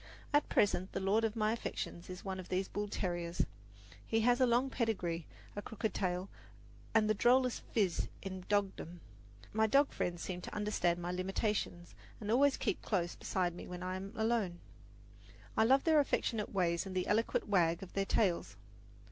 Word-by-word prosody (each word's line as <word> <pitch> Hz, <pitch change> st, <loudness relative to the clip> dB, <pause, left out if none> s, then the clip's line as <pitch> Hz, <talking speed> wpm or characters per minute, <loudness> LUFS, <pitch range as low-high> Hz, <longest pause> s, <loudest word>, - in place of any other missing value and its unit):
At 290 Hz, 0 st, +3 dB
present 190 Hz, -2 st, +2 dB
the -, -, -1 dB
lord 200 Hz, +4 st, +2 dB
of 220 Hz, 0 st, 0 dB
my 215 Hz, -1 st, +2 dB
affections 175 Hz, -6 st, -5 dB
is 180 Hz, +2 st, -8 dB
one 190 Hz, -1 st, -3 dB
of 185 Hz, -, -8 dB
these 185 Hz, +1 st, 0 dB
bull 205 Hz, 0 st, -3 dB
terriers. 175 Hz, -3 st, -1 dB, 0.6 s
He 225 Hz, 0 st, +1 dB
has 245 Hz, +3 st, +3 dB
a 255 Hz, -, +6 dB
long 245 Hz, +3 st, +2 dB
pedigree, 180 Hz, -, -1 dB, 0.3 s
a 205 Hz, -, -3 dB
crooked 220 Hz, +1 st, -3 dB
tail 180 Hz, 0 st, -1 dB, 0.7 s
and 220 Hz, -1 st, +5 dB
the 215 Hz, -, +4 dB
drollest 250 Hz, +3 st, +3 dB
"phiz" 195 Hz, -7 st, +1 dB, 0.2 s
in 190 Hz, -1 st, -5 dB
dogdom. 190 Hz, -4 st, -1 dB, 0.5 s
My 220 Hz, +1 st, +3 dB
dog 280 Hz, +5 st, +4 dB
friends 175 Hz, -1 st, -2 dB
seem 180 Hz, -1 st, -4 dB
to -, -, -7 dB
understand 210 Hz, -5 st, +1 dB
my 175 Hz, 0 st, -3 dB
limitations, 185 Hz, -1 st, -2 dB, 0.3 s
and 210 Hz, -1 st, -3 dB
always 275 Hz, +3 st, +4 dB
keep -, -, -1 dB
close 175 Hz, -5 st, 0 dB
beside 180 Hz, -2 st, -1 dB
me 175 Hz, -, -8 dB
when 180 Hz, 0 st, -6 dB
I 185 Hz, 0 st, -2 dB
am 195 Hz, +1 st, -6 dB
alone. 220 Hz, -6 st, 0 dB, 1.0 s
I 220 Hz, -, +4 dB
love 270 Hz, +3 st, +5 dB
their 320 Hz, -2 st, +5 dB
affectionate 230 Hz, -6 st, 0 dB
ways 175 Hz, -2 st, +1 dB
and 185 Hz, -, -6 dB
the 185 Hz, -, +1 dB
eloquent 225 Hz, +2 st, +1 dB
wag 170 Hz, -4 st, +2 dB
of 185 Hz, -, -10 dB
their 195 Hz, 0 st, 0 dB
tails. 190 Hz, -4 st, +1 dB
195 Hz, 180 wpm, -34 LUFS, 180-225 Hz, 1.0 s, a